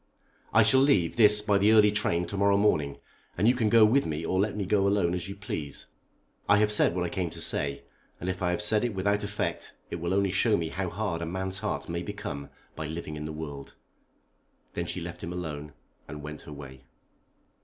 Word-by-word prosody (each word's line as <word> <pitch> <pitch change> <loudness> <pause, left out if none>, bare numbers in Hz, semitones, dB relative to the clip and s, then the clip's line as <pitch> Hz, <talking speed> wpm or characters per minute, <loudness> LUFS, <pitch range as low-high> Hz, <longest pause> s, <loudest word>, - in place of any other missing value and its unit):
I 110 - +6
shall 130 +5 +5
leave 100 - +3
this 105 -2 +6
by 105 -2 +2
the 105 +2 +4
early 105 -1 +6
train 90 -4 0
to 85 - -6
morrow 100 0 +3
morning, 75 -9 +1 0.4
and 100 +5 +3
you 120 - +6
can 115 -4 +1
go 115 0 +7
with 130 +6 +3
me 80 +1 -3
or 95 - 0
let 105 +1 0
me 100 - -2
go 100 0 +2
alone 100 -4 +2
as 90 +2 -3
you 100 - -6
please. 80 -8 -6 0.6
I 100 - +6
have 105 0 +3
said 105 -4 +3
what 90 - 0
I - - -2
came 90 -1 -2
to - - -8
say, 70 -1 0 0.4
and 90 - -6
if 95 0 -3
I 90 - +1
have 90 +4 0
said 105 +1 +3
it 120 -4 -2
without 100 +2 0
effect 105 0 -3 0.2
it - - -3
will 85 +2 -1
only 100 -1 +2
show 105 +3 +2
me 80 -1 -2
how 95 +2 -3
hard 90 -2 -3
a 85 - -3
man's 95 +2 -2
heart - - -3
may 85 0 -3
become 100 -7 -6 0.3
by 80 - -5
living 80 -1 -6
in 75 0 -6
the 80 - -4
world." 75 -3 -8 1.0
Then - - -3
she 90 - -4
left 85 +1 -7
him 85 - -4
alone 75 -4 -5 0.4
and 75 -1 -8
went 75 0 -7
her - - -8
way. 70 -3 -10
95 Hz, 230 wpm, -28 LUFS, 80-105 Hz, 1.0 s, go